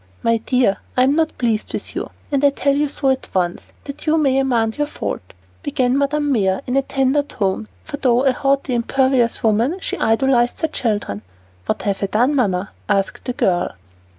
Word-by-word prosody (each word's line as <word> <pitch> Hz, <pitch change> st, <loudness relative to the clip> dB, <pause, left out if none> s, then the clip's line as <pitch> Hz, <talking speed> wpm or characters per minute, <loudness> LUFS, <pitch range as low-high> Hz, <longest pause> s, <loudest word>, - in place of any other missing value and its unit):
"My 230 Hz, 0 st, +3 dB
dear, 240 Hz, -3 st, +1 dB, 0.2 s
I'm 260 Hz, +3 st, +4 dB
not 320 Hz, 0 st, 0 dB
pleased 225 Hz, -3 st, -1 dB
with -, -, -4 dB
you, -, -, -3 dB, 0.2 s
and 280 Hz, -1 st, +1 dB
I 285 Hz, -, +7 dB
tell 280 Hz, 0 st, 0 dB
you 295 Hz, 0 st, +1 dB
so 275 Hz, -1 st, +1 dB
at 265 Hz, -, -2 dB
once, 175 Hz, -1 st, -1 dB
that 280 Hz, +2 st, -9 dB
you 315 Hz, +1 st, +4 dB
may 270 Hz, -4 st, +3 dB
amend 235 Hz, -3 st, 0 dB
your 295 Hz, -, +1 dB
fault," -, -, -4 dB, 0.4 s
began 260 Hz, -3 st, 0 dB
Madame 285 Hz, +1 st, +1 dB
Mère 195 Hz, -2 st, +1 dB
in 250 Hz, -, -2 dB
a 275 Hz, -, +4 dB
tender 270 Hz, +1 st, +1 dB
tone, 210 Hz, -6 st, -2 dB, 0.2 s
for 295 Hz, -2 st, -6 dB
though 250 Hz, -2 st, +2 dB
a 265 Hz, -, +5 dB
haughty, 275 Hz, 0 st, 0 dB
imperious 250 Hz, 0 st, +1 dB
woman, 230 Hz, -, +2 dB
she -, -, -3 dB
idolized 240 Hz, +2 st, +2 dB
her 320 Hz, -, +2 dB
children. 210 Hz, -, -2 dB, 0.5 s
"What -, -, -1 dB
have 200 Hz, -1 st, -1 dB
I 200 Hz, -, +1 dB
done, 245 Hz, +8 st, +2 dB
Mamma?" 200 Hz, -8 st, 0 dB, 0.2 s
asked 195 Hz, -1 st, 0 dB
the 250 Hz, -, -2 dB
girl. 180 Hz, -6 st, 0 dB
255 Hz, 190 wpm, -20 LUFS, 220-280 Hz, 0.5 s, I